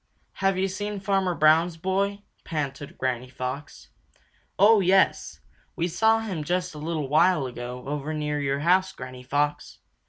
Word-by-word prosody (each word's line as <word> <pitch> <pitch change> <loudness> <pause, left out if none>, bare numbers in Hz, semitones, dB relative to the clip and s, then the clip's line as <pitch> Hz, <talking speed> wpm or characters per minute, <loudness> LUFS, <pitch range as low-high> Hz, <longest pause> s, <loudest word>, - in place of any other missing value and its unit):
"Have 195 -1 +2
you 190 +1 +1
seen 205 +2 -4
Farmer 195 -2 0
Brown's 160 +2 +4
boy?" 200 +3 -1 0.2
panted 145 -3 -5
Granny 130 -1 -2
Fox. 130 +3 -6 0.7
"Oh, 210 +2 +6
yes! 190 0 +2 0.3
We 170 -1 0
saw 220 +5 +2
him 190 -8 -4
just 180 +2 -1
a 150 - -9
little 155 -2 -3
while 155 +1 +3
ago 125 0 -6
over 145 +1 -3
near 150 -1 -2
your 140 0 -1
house, 185 +3 +3
Granny 130 0 -9
Fox. 145 +3 -2
160 Hz, 150 wpm, -25 LUFS, 140-190 Hz, 0.7 s, Oh